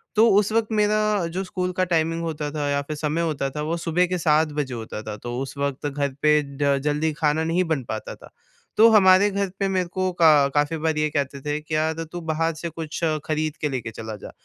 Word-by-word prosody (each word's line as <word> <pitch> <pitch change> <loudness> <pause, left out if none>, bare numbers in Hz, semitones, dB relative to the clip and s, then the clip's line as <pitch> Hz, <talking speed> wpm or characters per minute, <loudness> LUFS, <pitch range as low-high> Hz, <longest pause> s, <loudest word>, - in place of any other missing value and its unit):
तो 220 +2 +6
उस 205 +1 +3
वक़्त 225 -1 +1
मेरा 210 0 +2 0.3
जो 180 +3 -3
स्कूल 180 -1 -3
का 185 - +3
टाइमिंग 165 -1 0
होता 155 -2 -3
था 150 -1 -2
या 140 0 +1
फ़िर 150 +2 -6
समय 155 +2 -1
होता 150 -4 -1
था 150 +2 -5
वो 160 +3 -2
सुबह 170 +2 +1
के 180 +1 -1
7 155 -2 +2
बजे 135 -3 -2
होता 110 -2 -6
था। 110 - -5
तो 120 +3 -6
उस 135 +1 -6
वक़्त 140 0 -2
घर 140 -1 -2
पे 150 0 +4 0.2
ड 140 -1 +2
जल्दी 150 +2 0
खाना 150 +1 +1
नहीं 165 +3 +1
बन 135 - -5
पाता 110 - -5
था। - - -15 0.5
तो 220 +2 +8
हमारे 195 -1 +6
घर 200 0 -1
पे 195 - +1
मेरे 185 -2 0
को 185 +1 -1
का 155 -5 +5
काफ़ी 145 +2 +1
बार 160 0 -1
ये 155 0 +1
कहते 140 -1 -2
थे 150 +1 -2
कि - - -14
क्या 155 +1 0
त 165 +1 -5
तू 175 - -6
बाहर 165 0 -1
से 165 +2 -5
कुछ 160 -1 -6 0.3
खरीद 155 0 -1
के 150 - -2
लेके 120 -4 -4
चला 110 -1 -7
जा। - - -8
155 Hz, 240 wpm, -23 LUFS, 145-175 Hz, 0.5 s, तो